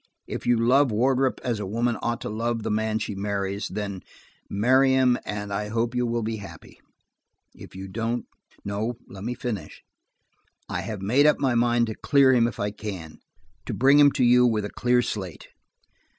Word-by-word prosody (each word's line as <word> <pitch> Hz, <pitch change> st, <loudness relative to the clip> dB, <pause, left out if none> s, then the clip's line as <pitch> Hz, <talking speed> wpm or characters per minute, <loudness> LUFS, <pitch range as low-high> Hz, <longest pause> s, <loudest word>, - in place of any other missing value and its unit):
If -, -, -6 dB
you 120 Hz, -1 st, +4 dB
love 130 Hz, +4 st, +4 dB
Wardrop 130 Hz, +4 st, +1 dB
as 120 Hz, -4 st, -1 dB
a 105 Hz, -, -3 dB
woman 115 Hz, +3 st, 0 dB
ought 120 Hz, -1 st, -2 dB
to -, -, -4 dB
love 115 Hz, +1 st, -2 dB
the -, -, -2 dB
man 110 Hz, 0 st, 0 dB
she 110 Hz, -1 st, -3 dB
marries, 100 Hz, 0 st, -3 dB
then 100 Hz, -3 st, -5 dB, 0.5 s
marry 130 Hz, +6 st, +3 dB
him 130 Hz, -2 st, +4 dB
and 105 Hz, -1 st, -4 dB
I 105 Hz, +1 st, -2 dB
hope 115 Hz, +2 st, -1 dB
you 125 Hz, -1 st, 0 dB
will 115 Hz, 0 st, -1 dB
be 110 Hz, 0 st, -3 dB
happy. 100 Hz, -1 st, -12 dB, 0.7 s
If -, -, -13 dB
you 95 Hz, +1 st, -7 dB
don't–no, 115 Hz, 0 st, -4 dB
let 95 Hz, 0 st, -10 dB
me 120 Hz, +3 st, -3 dB
finish. 105 Hz, -12 st, -6 dB, 0.8 s
I 90 Hz, -, -3 dB
have 100 Hz, 0 st, -6 dB
made 130 Hz, +9 st, +4 dB
up 150 Hz, -, +4 dB
my 130 Hz, -3 st, +1 dB
mind 120 Hz, 0 st, +2 dB
to 110 Hz, -, -4 dB
clear 135 Hz, +2 st, +4 dB
him 120 Hz, -2 st, +4 dB
if 120 Hz, -, -7 dB
I 100 Hz, 0 st, -1 dB
can: 95 Hz, -7 st, -7 dB, 0.5 s
to -, -, -3 dB
bring 140 Hz, +3 st, +5 dB
him 145 Hz, -1 st, +7 dB
to 130 Hz, -, +1 dB
you 125 Hz, +1 st, +6 dB
with 110 Hz, -4 st, +2 dB
a -, -, -6 dB
clear 125 Hz, 0 st, +2 dB
slate. 95 Hz, -9 st, -6 dB
115 Hz, 190 wpm, -25 LUFS, 105-125 Hz, 0.8 s, him